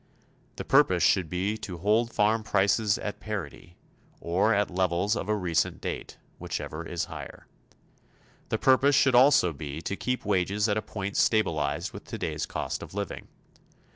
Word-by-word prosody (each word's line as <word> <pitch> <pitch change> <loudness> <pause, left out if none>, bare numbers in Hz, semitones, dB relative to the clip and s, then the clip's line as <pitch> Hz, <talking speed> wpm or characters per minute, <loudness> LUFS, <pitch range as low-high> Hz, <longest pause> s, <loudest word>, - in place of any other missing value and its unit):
The - - -6
purpose - - +4
should 90 -5 +3
be 95 +5 -1
to 90 -5 -6
hold 110 +6 +1
farm 110 +2 +2
prices 105 0 +2
at 105 - -5
parity, 85 -5 -7 0.4
or 90 +6 +1
at 105 -3 +1
levels 90 +3 +1
of 105 - -4
a 105 - +2
recent 90 -7 0
date, - - -6 0.2
whichever 80 +2 -5
is 85 0 -3
higher. - - -9 1.0
The - - 0
purpose 135 +2 +4
should 135 -1 +4
also 125 - +5
be 75 0 -6
to 100 - -3
keep 125 +4 -3
wages 100 +2 +1
at 105 - +1
a 110 - 0
point 100 -2 -5
stabilized 75 -10 +1
with - - -10
today's - - -4
cost - - -4
of - - -10
living. 100 -1 -5
100 Hz, 160 wpm, -27 LUFS, 85-110 Hz, 1.0 s, also